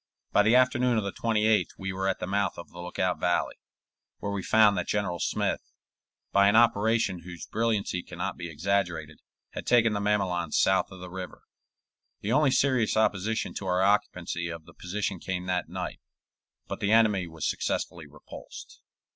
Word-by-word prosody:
By - - +5
the 110 +4 +4
afternoon 125 -1 +3
of 110 - +1
the 100 - -3
28th 110 -1 +1
we 95 -1 -4
were 95 +1 -2
at 95 - 0
the - - -4
mouth 100 0 -1
of 85 - -10
the 85 - -11
Lookout 90 +1 -2
Valley, 90 - 0 0.6
where 100 - -4
we 100 -1 -2
found 105 +1 +5
that 90 - -2
General 95 -5 -1
Smith, - - 0 0.7
by 100 0 +5
an 100 - +4
operation 110 -4 +3
whose 85 0 -9
brilliancy 110 -5 -1
can - - -11
not - - -2
be 85 - -6
exaggerated, 80 -2 -1 0.3
had - - -7
taken 115 -2 +4
the 105 - -1
mamelons 95 -5 0
south 95 0 +3
of 95 -2 -12
the 90 -1 -8
river. 95 -1 -8 0.8
The 105 - -2
only 150 +2 +4
serious 130 -4 +2
opposition 110 0 0
to 95 - -5
our 90 +1 +2
occupancy 90 -4 0
of 85 -1 -7
the 85 - -15
position 95 +1 -3
came 90 0 -4
that 90 -1 -1
night, - - -5 0.7
but - - -5
the 105 - 0
enemy 105 -5 +4
was 80 -1 -4
successfully 85 -4 -2
repulsed. 75 +1 -12
100 Hz, 180 wpm, -28 LUFS, 90-110 Hz, 0.8 s, By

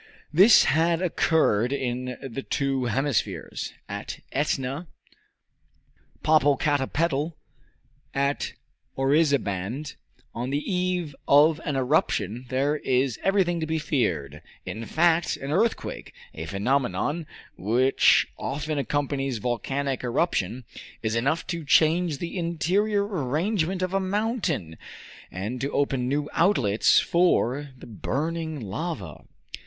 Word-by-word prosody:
This 195 +8 +8
had 165 +2 +2
occurred 155 - +2
in 125 -2 -3
the 130 +2 -5
two 135 -2 -1
hemispheres 135 +2 -1 0.2
at - - -6
Etna, 140 +2 -1 1.4
Popocatepetl, 145 +1 +2 0.8
at 140 +1 -1 0.4
Orizabaand 135 - +1 0.4
on 120 +2 -3
the 140 - 0 0.2
eve 180 -5 -1
of 150 +3 +5
an 145 -4 -2
eruption 125 - 0
there 140 +3 +1
is 130 -3 0
everything 190 -3 +2
to 160 - -2
be 160 +1 0
feared. 80 - -1 0.2
In 110 - -5
fact, 170 0 +2
an 135 +1 -5
earthquake 220 +8 -1 0.2
a 80 - -6
phenomenon 135 +8 -1 0.3
which 125 +7 +3
often 150 +2 -2
accompanies 140 -2 -1
volcanic 130 +4 -2
eruption 125 - 0 0.4
is 110 0 0
enough 140 +8 0
to 170 -2 -4
change 160 +2 +3
the 170 +4 -4
interior 195 +5 +1
arrangement 180 - -1
of 185 0 -2
a 195 - +2
mountain, 190 - -2 0.5
and 105 +7 -5
to 140 - -1
open 135 -3 0
new 145 +2 0
outlets 135 - +4
for 145 -5 +2
the - - -12
burning 155 - -3
lava. 105 - -5
145 Hz, 110 wpm, -25 LUFS, 125-165 Hz, 1.4 s, This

